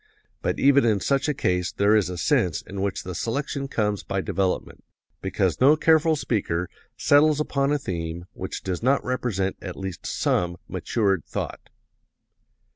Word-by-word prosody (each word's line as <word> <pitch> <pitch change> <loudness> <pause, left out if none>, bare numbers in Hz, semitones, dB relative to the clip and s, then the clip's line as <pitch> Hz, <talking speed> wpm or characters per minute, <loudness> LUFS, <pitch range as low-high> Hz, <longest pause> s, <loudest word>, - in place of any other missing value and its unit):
But - - -1
even 140 0 +5
in 110 -3 +3
such 140 +8 +1
a - - +2
case 90 -4 0
there 100 +2 +3
is 100 -5 +2
a 90 - -5
sense 90 - +1
in 95 0 -6
which 100 -1 -2
the 90 - -5
selection 135 - -2
comes 105 -6 -1
by 95 - -3
development, 95 0 -2 0.4
because - - -1
no 140 +4 +7
careful 160 0 +4
speaker 95 - -1 0.3
settles 150 +1 +4
upon 140 -2 0
a 150 - +3
theme 85 - -4
which 95 - -6
does 90 -2 -3
not 135 +4 +2
represent 115 -7 -1
at 90 -2 -7
least 95 -2 -6
some 85 0 0
matured 100 -8 0
thought." - - -5
105 Hz, 160 wpm, -25 LUFS, 90-140 Hz, 0.4 s, no